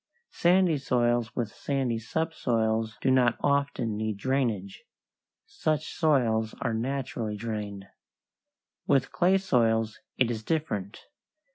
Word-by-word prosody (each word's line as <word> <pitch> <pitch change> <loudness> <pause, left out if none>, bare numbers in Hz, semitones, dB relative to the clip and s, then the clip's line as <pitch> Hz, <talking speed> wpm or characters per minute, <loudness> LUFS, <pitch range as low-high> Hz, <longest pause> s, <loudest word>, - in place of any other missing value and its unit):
Sandy 175 -3 +3
soils 120 -3 +1
with 115 -4 -2
sandy 130 -5 -1
subsoils 115 -5 -1
do 130 - +3
not 125 -2 +3
often 140 -6 0
need 110 -1 -2
drainage; 110 -5 -1 0.6
such 155 -1 -2
soils 115 -8 +2
are 120 -4 -1
naturally 125 -2 -3
drained. 105 -3 -5 1.0
With 135 -1 +2
clay 185 +2 +3
soils 115 - +1 0.2
it 125 -2 +2
is 110 -2 -4
different. 110 - -2
120 Hz, 110 wpm, -28 LUFS, 110-140 Hz, 1.0 s, Sandy